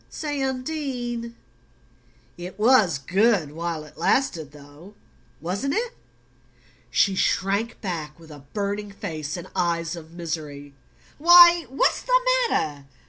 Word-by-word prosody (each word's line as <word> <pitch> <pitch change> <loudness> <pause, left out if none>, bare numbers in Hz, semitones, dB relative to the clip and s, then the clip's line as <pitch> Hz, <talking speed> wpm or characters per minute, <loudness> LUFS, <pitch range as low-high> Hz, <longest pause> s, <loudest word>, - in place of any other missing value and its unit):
"Say, 290 -3 -4
Undine 255 -4 -3 1.0
it 180 +2 -9
was 215 - +4
good 185 - +1
while 165 0 -4
it 150 - -16
lasted, 165 - 0
though, 150 +7 -15 0.4
wasn't 195 - -2
it?" 475 +2 -2 0.9
She 195 +10 +2
shrank 200 +4 0
back 165 -5 -5
with 160 -1 -15
a 145 - -11
burning 205 0 -3
face 160 -5 -5
and 175 +1 -8
eyes 170 -2 -1
of 165 -1 -12
misery. 155 -4 -6 0.5
"Why, 345 0 +8
what's 265 - +1
the - - +3 0.3
matter? 145 -2 -2
190 Hz, 120 wpm, -24 LUFS, 160-245 Hz, 1.0 s, Why